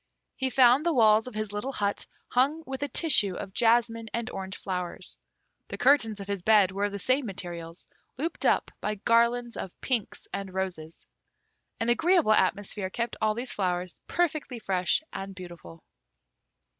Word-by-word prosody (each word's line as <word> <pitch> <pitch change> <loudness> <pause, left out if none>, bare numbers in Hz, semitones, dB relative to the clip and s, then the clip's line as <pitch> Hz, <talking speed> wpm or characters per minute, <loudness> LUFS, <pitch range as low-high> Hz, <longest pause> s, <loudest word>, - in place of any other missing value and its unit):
He 265 -1 -1
found 255 +2 +5
the 340 -2 +1
walls 220 -1 +5
of 250 - -8
his 215 -1 -3
little 250 +7 -3
hut 205 -3 -2 0.2
hung 280 +6 +1
with 265 0 -6
a 285 - 0
tissue 260 - +3
of 190 - -7
jasmine 230 0 +2
and 235 -1 -3
orange 190 0 -6
flowers. 180 -2 -5 0.5
The - - -6
curtains 245 -6 +3
of 200 - -6
his 200 -2 -3
bed 205 -1 +5
were 200 +2 -1
of 205 - -2
the 200 - -4
same 255 +6 +1
materials, 175 -3 -7 0.3
looped 320 +5 -3
up - - +2
by 210 0 -1
garlands 235 +3 +2
of 185 - -7
pinks 240 -6 -2
and 195 -1 -5
roses. 175 -4 -4 0.7
An 225 0 0
agreeable 325 - +4
atmosphere 200 -2 0
kept 235 +4 -3
all 215 0 +2
these 245 +2 -4
flowers 180 -2 -2
perfectly 310 -7 -1
fresh 185 - 0
and 195 0 -6
beautiful. 175 -2 -11
215 Hz, 165 wpm, -27 LUFS, 190-250 Hz, 0.7 s, found